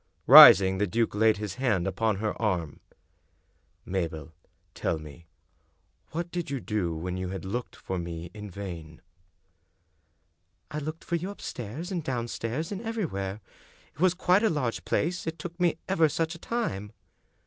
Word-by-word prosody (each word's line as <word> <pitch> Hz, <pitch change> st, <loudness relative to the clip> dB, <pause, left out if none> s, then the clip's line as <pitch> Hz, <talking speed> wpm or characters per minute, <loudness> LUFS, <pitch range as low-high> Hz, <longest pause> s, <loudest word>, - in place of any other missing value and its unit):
Rising, 95 Hz, 0 st, +10 dB
the 105 Hz, -, +1 dB
duke 115 Hz, +4 st, 0 dB
laid 110 Hz, 0 st, +3 dB
his 105 Hz, -3 st, -4 dB
hand 105 Hz, -9 st, +1 dB
upon 105 Hz, +3 st, 0 dB
her 105 Hz, +2 st, -2 dB
arm. 90 Hz, -9 st, -1 dB, 0.5 s
" -, -, -42 dB
Mabel, 80 Hz, -3 st, -3 dB, 0.4 s
tell 85 Hz, -, -1 dB
me 75 Hz, +2 st, -12 dB, 0.4 s
— 75 Hz, -, -42 dB
^what 170 Hz, +2 st, -4 dB
did 175 Hz, -2 st, -3 dB
you 140 Hz, -1 st, -2 dB
do 105 Hz, -8 st, -2 dB
when 90 Hz, +3 st, -4 dB
you 95 Hz, 0 st, -3 dB
had 95 Hz, 0 st, -6 dB
looked 120 Hz, +6 st, -4 dB
for 95 Hz, -1 st, -5 dB
me 85 Hz, 0 st, -6 dB
in 105 Hz, -1 st, -8 dB
vain? 85 Hz, -4 st, -8 dB, 0.8 s
" 80 Hz, -, -45 dB
"I 150 Hz, -, -3 dB
looked 155 Hz, +2 st, -6 dB
for 170 Hz, -, -1 dB
you 180 Hz, +4 st, -5 dB
upstairs 155 Hz, -, -6 dB
and 175 Hz, -4 st, -2 dB
downstairs 125 Hz, -, -3 dB
and 200 Hz, 0 st, -4 dB
every 225 Hz, -3 st, -2 dB
where. 100 Hz, -5 st, -4 dB, 0.5 s
It -, -, -24 dB
was 185 Hz, +1 st, +3 dB
quite 180 Hz, +2 st, +3 dB
a 220 Hz, -, +3 dB
large 130 Hz, -7 st, -2 dB
place, 175 Hz, +1 st, -1 dB
it 160 Hz, 0 st, -3 dB
took 175 Hz, +1 st, -8 dB
me 175 Hz, -3 st, +2 dB
ever 165 Hz, -5 st, +3 dB
such 165 Hz, +3 st, -1 dB
a 170 Hz, -, -10 dB
time. 105 Hz, -, -3 dB
110 Hz, 170 wpm, -28 LUFS, -, 0.8 s, Rising